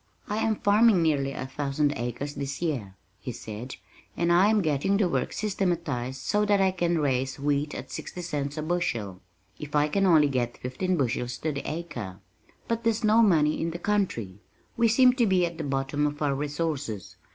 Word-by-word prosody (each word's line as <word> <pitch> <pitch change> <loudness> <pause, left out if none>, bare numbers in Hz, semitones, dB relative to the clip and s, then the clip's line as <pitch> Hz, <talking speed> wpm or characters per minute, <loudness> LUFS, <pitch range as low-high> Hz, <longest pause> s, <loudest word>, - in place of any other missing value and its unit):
"I 210 - -2
am 220 0 +1
farming 205 -2 +4
nearly 140 -4 +1
a 130 - -5
thousand 140 +2 -1
acres 120 +5 -4
this 140 -1 -4
year," 130 - -3 0.2
he 125 - -5
said, 115 +3 -7 0.4
"and 170 0 +2
I'm 205 +4 +4
getting 155 +6 +1
the 200 -3 +2
work 135 -7 -1
systematized 170 - -2
so 210 0 +1
that 205 -1 +3
I 190 -1 +3
can 175 -2 0
raise 135 -3 0
wheat 145 +1 0
at - - -7
sixty 180 - -6
cents 145 -3 -3
a 155 - -2
bushel 120 - -2 0.4
if 150 0 -6
I 150 0 +4
can 195 +3 +2
only 155 -4 +6
get 125 -3 -1
fifteen 175 +9 -2
bushels 125 -2 -1
to 155 - -2
the 140 -1 -4
acre. 120 - -6 0.5
But 230 0 -1
there's 230 0 +1
no 215 +2 +5
money 155 -8 +3
in 165 - 0
the 165 - -5
country. 170 - -1 0.4
We 230 0 +3
seem 250 +3 +5
to 245 -3 +2
be 185 -2 +3
at 170 -1 -6
the - - -2
bottom 140 +1 0
of 145 0 -5
our 140 -1 +2
resources. 145 - -3
150 Hz, 190 wpm, -27 LUFS, 135-185 Hz, 0.5 s, only